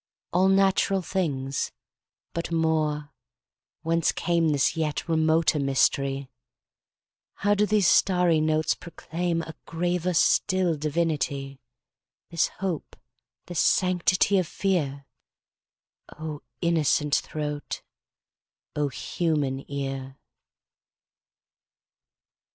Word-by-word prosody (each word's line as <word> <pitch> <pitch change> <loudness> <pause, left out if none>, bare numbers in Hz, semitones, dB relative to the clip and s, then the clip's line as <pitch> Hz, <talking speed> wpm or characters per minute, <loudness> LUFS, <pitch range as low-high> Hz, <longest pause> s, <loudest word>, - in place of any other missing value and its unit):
All 185 +2 +4
natural 195 0 +3
things! 140 -8 -2 0.6
But 170 0 -4
more—Whence 160 +1 -2
cameThis 165 -5 +1
yet 155 0 -2
remoter 160 -1 +2
mystery? 135 0 +1 1.1
How 205 +1 +2
do 205 +1 +2
these 210 -2 +3
starry 180 -4 +4
notes 155 0 +2
proclaimA 165 -1 -4
graver 175 +1 -1
still 185 0 +3
divinity? 145 -3 -2 0.7
This 165 -1 +2
hope, 185 -5 -5 0.5
this 175 -2 -3
sanctity 185 +1 +3
of 180 - -1
fear?O 155 -2 -6 0.2
innocent 155 -3 +2
throat! 150 -1 -4 0.9
O 150 -1 +1
human 140 -2 -1
ear! 135 -1 -4
160 Hz, 75 wpm, -26 LUFS, 145-175 Hz, 1.1 s, All